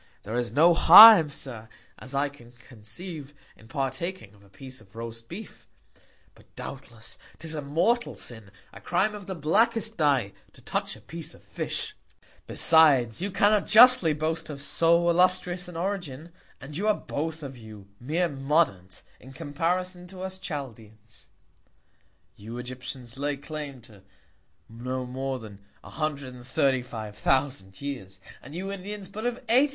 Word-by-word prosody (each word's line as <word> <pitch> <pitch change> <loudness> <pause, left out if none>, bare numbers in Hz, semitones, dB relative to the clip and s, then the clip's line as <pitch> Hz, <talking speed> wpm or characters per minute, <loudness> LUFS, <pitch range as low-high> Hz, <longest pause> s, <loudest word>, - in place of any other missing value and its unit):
There 105 - -7
is 120 -1 -1
no 160 +7 +5
Harm, 185 0 +10
Sir, 120 -6 -8 0.3
as 130 +2 -8
I 140 +1 +2
can 120 -4 -15
conceive, 135 - -10 0.2
in 110 - -18
partaking 135 - -4
of 100 -1 -21
a 100 - -21
Piece 130 +6 -12
of 95 -1 -21
roast 115 0 -8
Beef; 210 +5 -10 0.7
but, - - -22
doubtless, 120 -4 -9 0.2
'tis 160 -1 -5
a 155 - -3
mortal 175 +13 0
Sin, 110 -4 -8 0.2
a - - -12
Crime 215 - 0
of 205 -3 -9
the 190 - -4
blackest 220 +8 +1
Dye, 135 - +2 0.2
to - - -18
touch - - -2
a - - -16
Piece 165 -2 -8
of - - -20
Fish. - - -3 0.5
Besides, 145 -7 +4
you 200 - -1
cannot 205 +1 +2
justly 225 -5 +7
boast 155 +2 -2
of 145 -2 -7
so 170 +4 +3
illustrious 180 +1 +2
an 175 -2 -8
Origin, 170 -5 -4 0.3
and 145 +1 -10
you 200 +6 -2
are 215 - +4
both 160 +1 -5
of 135 -2 -7
you 110 -4 -12
mere 160 +8 0
Moderns, 135 - -1 0.2
in 130 +1 -14
Comparison 175 +5 -3
to 185 0 -10
us 190 0 -6
Chaldeans, 115 - -9 1.1
You 115 +4 -9
Egyptians 125 0 -8
lay 145 0 -1
claim 145 -2 -7
to 110 -4 -17 0.7
no 125 +3 -5
more 130 +1 -4
than 105 -4 -11 0.2
135,000 125 -6 -2
Years, 100 -10 -7 0.2
and 140 +5 -11
you 190 +3 -4
Indians, 200 +1 -6
but 215 +5 -4
of 245 - -1
80,000. 260 +6 +5
145 Hz, 150 wpm, -26 LUFS, 120-175 Hz, 1.1 s, Harm